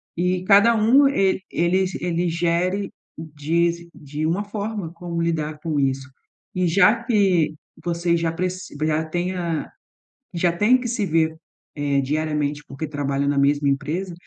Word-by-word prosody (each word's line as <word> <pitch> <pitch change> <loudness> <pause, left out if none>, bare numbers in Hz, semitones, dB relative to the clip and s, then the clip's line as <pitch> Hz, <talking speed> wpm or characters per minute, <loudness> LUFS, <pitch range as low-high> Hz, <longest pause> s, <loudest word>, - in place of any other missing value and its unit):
E 180 +1 0
cada 205 +4 +6
um 235 +6 +5
e 195 -6 +1
eles, 185 +2 +1
ele 175 0 0
gere 175 +4 0 0.3
diz 165 +2 -1
de 150 +1 -5
uma 170 +6 0
forma 205 -4 -4
como 170 -1 -4
lidar 155 -2 -2
com 155 -2 -2
isso 135 -1 -1 0.5
e 180 0 +1
já 205 +7 +4
que 190 -9 +2 0.3
você 170 0 0
já 165 -1 0
pre 180 +2 -1 0.4
já 155 0 +1
tenha 175 -1 -2 0.7
já 175 0 +2
tem 210 +8 +4
que 245 - -4
se 225 -4 -1
ver 160 -1 +1 0.4
é 140 -1 +1
diariamente 150 +1 -1
porque 140 +3 -6
trabalha 140 -1 -1
na 145 - +1
mesma 145 +1 +2
empresa, 155 +7 -2
170 Hz, 145 wpm, -22 LUFS, 150-185 Hz, 0.7 s, cada